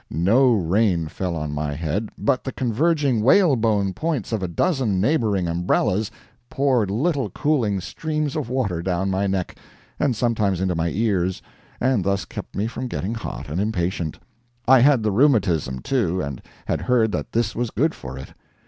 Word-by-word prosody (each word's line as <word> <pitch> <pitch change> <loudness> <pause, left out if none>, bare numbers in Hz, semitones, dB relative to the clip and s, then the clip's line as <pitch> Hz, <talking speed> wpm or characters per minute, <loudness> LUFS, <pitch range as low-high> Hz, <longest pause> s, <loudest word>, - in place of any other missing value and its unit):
No 115 - +3
rain 95 -2 +2
fell 90 +1 -3
on 75 -2 -3
my 75 -1 -2
head, 85 +8 -2
but 140 -3 0
the 130 - -4
converging 135 0 +1
whalebone 115 - +3
points 155 - -2
of 110 -3 -1
a 95 - -1
dozen 115 - 0
neighboring 105 - +1
umbrellas 90 +4 +1 0.4
poured 130 -7 +1
little 140 - 0
cooling 125 -10 0
steams 150 - -3
of 150 -7 -3
water 110 -10 -1
down 95 +2 -1
my 95 +1 0
neck, 95 -2 -2 0.4
and 125 - +1
sometimes 105 -5 0
into 95 -1 0
my 85 0 0
ears, 95 -3 0 0.4
and 125 -6 +2
thus 100 -1 0
kept - - -8
me 100 - 0
from 125 +3 -4
getting 110 -2 -3
hot 115 - -6
and 80 +6 -2
impatient. 90 -6 -2 0.5
I 130 +1 +7
had 130 -2 +4
the 105 - +1
rheumatism, 95 - +2
too, 95 -10 0
and 70 -7 -4 0.2
had - - -1
heard 115 -3 +2
that - - -4
this 115 -2 0
was 120 -1 -1
good 155 +9 +1
for 65 0 -8
it. 65 - -10
105 Hz, 170 wpm, -22 LUFS, 90-130 Hz, 0.5 s, I